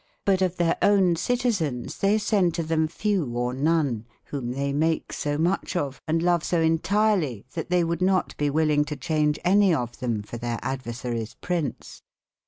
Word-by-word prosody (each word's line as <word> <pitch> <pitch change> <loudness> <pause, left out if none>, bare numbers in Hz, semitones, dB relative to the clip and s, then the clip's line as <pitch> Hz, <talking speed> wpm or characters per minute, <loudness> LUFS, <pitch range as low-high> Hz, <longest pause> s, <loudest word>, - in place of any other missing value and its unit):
Butof 185 -2 +2
tbeire 170 -2 +1
ownecy/ 195 +3 +3
tyzeins 170 - -2
tbey 205 +2 +3
sende 190 -6 +1
to 170 - -1
tbem 160 0 0
fewe 180 - -1
or 125 +1 -1
none, 140 -5 0 0.2
wbome 125 -3 -3
tbey 140 0 -1
make 160 +3 0
so 145 -1 -2
mucb 175 +4 0
of, 140 -5 -2
and 165 +1 +1
love 175 -2 +2
so 175 - 0
intierlye, 165 - +1
tbat 165 - -3
tbey 180 -1 +2
would 170 +1 -2
not 185 0 +1
be 145 -1 +1
will 155 +1 +2
ing 150 0 +3
to 150 -1 -5
cbaunge 150 +1 +1
anye 190 -2 +4
of 120 -1 -4
tbem 115 -5 -3
for 120 - -7
tbeirad/ 120 +3 -3
versaries 120 -2 -5
prince. 175 -5 -4
160 Hz, 180 wpm, -25 LUFS, 135-180 Hz, 0.2 s, anye